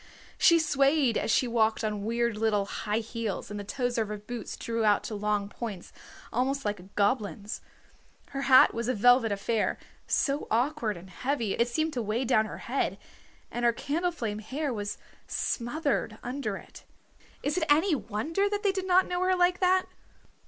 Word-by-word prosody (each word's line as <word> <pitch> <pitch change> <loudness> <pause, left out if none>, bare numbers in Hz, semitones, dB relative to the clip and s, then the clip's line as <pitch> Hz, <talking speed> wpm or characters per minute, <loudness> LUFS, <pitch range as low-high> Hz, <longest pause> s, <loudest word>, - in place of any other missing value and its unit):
She 335 - +7
swayed 280 -4 +3
as - - -1
she 250 - +3
walked 225 -1 +1
on 210 -2 -2
weird 235 +1 0
little 210 -2 +1
high 210 +2 -2
heels 225 -3 -4
and 205 - -4
the - - -5
toes 245 +3 -2
of 220 - 0
her 210 0 -4
boots 220 +2 -7
drew 230 -1 -2
out 210 -2 +3
to - - -5
long 210 -1 0
points, 205 -4 -7 0.4
almost 270 +3 0
like 205 -1 -1
a 185 +2 -14
goblin's. 205 0 0 0.7
Her 275 - -4
hat 260 - +8
was 230 0 -3
a 255 - +1
velvet 245 +1 +5
affair, 210 +2 0 0.3
so 285 +1 +1
awkward 235 - 0
and 185 +2 -12
heavy 250 -1 -1
it 235 - +2
seemed 315 +6 -1
to 245 - -1
weigh 225 +4 -1
down 220 -3 +3
her - - -7
head, - - -1 0.5
and 240 - -3
her 235 0 +4
candleflame 285 -7 -2
hair 270 +6 -3
was 205 -2 -4 0.3
smothered 245 -3 -1
under 265 +3 -3
it. - - -13 0.6
Is 285 - 0
it - - -1
any 320 +5 +4
wonder 285 - -1
that 410 0 -2
they 400 - +3
did 380 -1 -3
not 370 +1 +5
know 355 0 -1
her 370 0 +3
like 355 0 +3
that! 370 0 +3
235 Hz, 180 wpm, -28 LUFS, 210-285 Hz, 0.7 s, hat